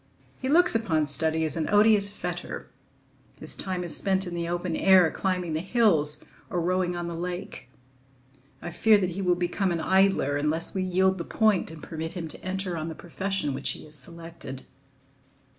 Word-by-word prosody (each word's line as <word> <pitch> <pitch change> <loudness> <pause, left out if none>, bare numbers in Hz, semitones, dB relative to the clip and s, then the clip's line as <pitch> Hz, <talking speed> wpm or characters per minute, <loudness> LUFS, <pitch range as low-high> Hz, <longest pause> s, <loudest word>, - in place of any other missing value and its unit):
He 260 - -3
looks 350 +5 +5
upon 175 -9 +1
study 160 +2 0
as 155 - -1
an 160 -2 -2
odious 205 -1 +5
fetter; 205 - -6 0.7
his - - -4
time 185 -2 -3
is 170 - -1
spent 190 -1 +1
in 175 - -6
the 170 -1 -3
open 175 -1 -2
air, 185 -4 +5
climbing 180 -4 -2
the 155 - 0
hills 165 -7 +2 0.2
or 175 - -1
rowing 180 +1 0
on 175 0 -3
the 170 - -4
lake. 175 -4 -6 0.9
I 175 - -5
fear 215 +5 +5
that 185 -3 -1
he 190 +3 -4
will 180 -2 +2
become 180 +2 -1
an 170 - -1
idler 190 -5 +2
unless 150 +3 -1
we 190 - -1
yield 190 +1 +2
the - - -2
point 215 0 +1
and 160 -1 -11
permit 160 0 -5
him 175 -4 -5
to - - -6
enter 185 -1 -2
on 160 -1 -4
the 160 - -6
profession 190 -3 -3
which 135 +1 -2
he - - -11
has 155 0 -14
selected. 165 -2 -10
175 Hz, 190 wpm, -26 LUFS, 160-190 Hz, 0.9 s, looks